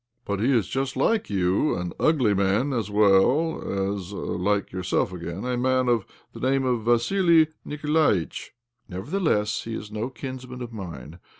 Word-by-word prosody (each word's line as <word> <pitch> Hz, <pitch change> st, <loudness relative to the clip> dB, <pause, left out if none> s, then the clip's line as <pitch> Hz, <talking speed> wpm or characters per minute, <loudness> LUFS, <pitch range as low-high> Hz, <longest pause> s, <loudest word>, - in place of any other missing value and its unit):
" -, -, -47 dB
But 100 Hz, -1 st, -2 dB
he 120 Hz, +6 st, +2 dB
is 115 Hz, -7 st, +2 dB
just 135 Hz, -1 st, -2 dB
like 215 Hz, +10 st, +1 dB
you— 95 Hz, +7 st, +1 dB
an 90 Hz, -1 st, -4 dB
ugly 130 Hz, -10 st, +3 dB
man, 100 Hz, +8 st, +1 dB
as 115 Hz, -4 st, -2 dB
well 100 Hz, +1 st, +2 dB
as 95 Hz, -2 st, -6 dB
(like 100 Hz, +1 st, -1 dB
yourself, 95 Hz, 0 st, -1 dB
again) 85 Hz, +3 st, -6 dB
a 125 Hz, 0 st, -1 dB
man 130 Hz, +1 st, +1 dB
of 120 Hz, -4 st, +1 dB, 0.3 s
the -, -, -9 dB
name 135 Hz, +1 st, +1 dB
of 120 Hz, -4 st, 0 dB
Vassili 160 Hz, +7 st, +4 dB
Nikolaitch?" 150 Hz, -, 0 dB, 0.2 s
" 120 Hz, -1 st, -47 dB
Nevertheless 105 Hz, -, -1 dB
he 115 Hz, 0 st, -4 dB
is 105 Hz, -, -7 dB
no 110 Hz, +3 st, -3 dB
kinsman 130 Hz, -1 st, -7 dB
of 120 Hz, -1 st, -8 dB
mine. 85 Hz, -, -8 dB
115 Hz, 170 wpm, -25 LUFS, 95-130 Hz, 0.3 s, Vassili